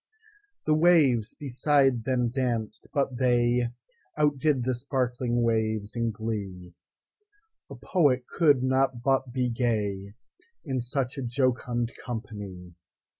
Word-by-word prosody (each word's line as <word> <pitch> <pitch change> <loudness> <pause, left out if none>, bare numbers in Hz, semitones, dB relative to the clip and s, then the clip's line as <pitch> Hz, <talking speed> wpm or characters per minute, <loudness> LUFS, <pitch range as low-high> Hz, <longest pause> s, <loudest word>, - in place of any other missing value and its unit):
The 155 - +3
waves 155 -9 +4
beside 135 -3 +1
them 125 -2 +1
danced, 120 -4 -2
but 135 -3 -1
theyOutdid 125 +3 0
the 130 +1 0
sparkling 125 -2 -1
waves 110 -2 0
in 115 -1 0
glee:—A 110 - -9
poet 140 -9 +1
could 145 -5 +3
not 130 -2 +1
but 135 -1 +1
be 125 -1 0
gayIn 115 - -4
such 125 +2 -2
a - - -3
jocund 120 -1 -1
company! 100 -7 -7
125 Hz, 100 wpm, -27 LUFS, 115-135 Hz, -, waves